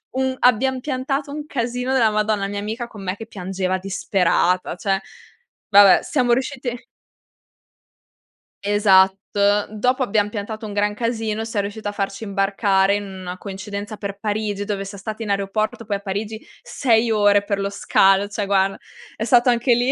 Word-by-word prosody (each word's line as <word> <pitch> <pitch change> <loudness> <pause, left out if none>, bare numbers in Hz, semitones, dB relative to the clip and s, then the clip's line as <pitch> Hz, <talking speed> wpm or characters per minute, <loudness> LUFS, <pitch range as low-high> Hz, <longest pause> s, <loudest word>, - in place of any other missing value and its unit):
un 260 0 0
abbiam 255 +2 +3
piantato 275 +1 -2
un 295 0 -5
casino 250 -1 -2
della 235 -4 +4
Madonna. 215 -1 0
La - - 0
mia 205 - -4
amica 220 +4 -4
con 210 -4 -11
me 185 0 -2
che 225 +2 -9
piangeva 185 -2 -3
disperata 185 -2 0
cioè. 195 +1 -1 0.7
Vabbè 200 -2 +7
siamo 250 -5 +1
riusciti 250 -1 -2 1.8
Esatto. 195 -2 +5 0.5
Dopo 250 +5 0
abbiam 210 -4 +1
piantato 215 +1 -5
un 205 - -6
gran 205 0 0
casino, 225 -1 -2
siam 220 -3 -1
riuscite 205 +1 -6
a - - -1
farci 200 +1 -4
imbarcare 195 -1 +2
in 205 - -3
una 185 -2 -7
coincidenza 200 +2 -6
per 200 -1 -6
Parigi 205 -1 -2
dove 200 -1 -3
siam 195 0 -8
state 215 +3 -6
in 210 - -6
aeroporto, 200 +3 -1
poi, 200 -2 -1
a - - -13
Parigi, 210 +3 -5 0.2
6 230 -3 +1
ore 205 -1 +4
per 200 -1 -2
lo 200 0 -1
scalo 195 0 +3
cioè 205 0 -3
guarda, 195 0 +2 0.4
è 220 - -4
stato 240 +2 +4
anche 240 +1 +3
lì 245 +3 +1
210 Hz, 165 wpm, -21 LUFS, 195-230 Hz, 1.8 s, Vabbè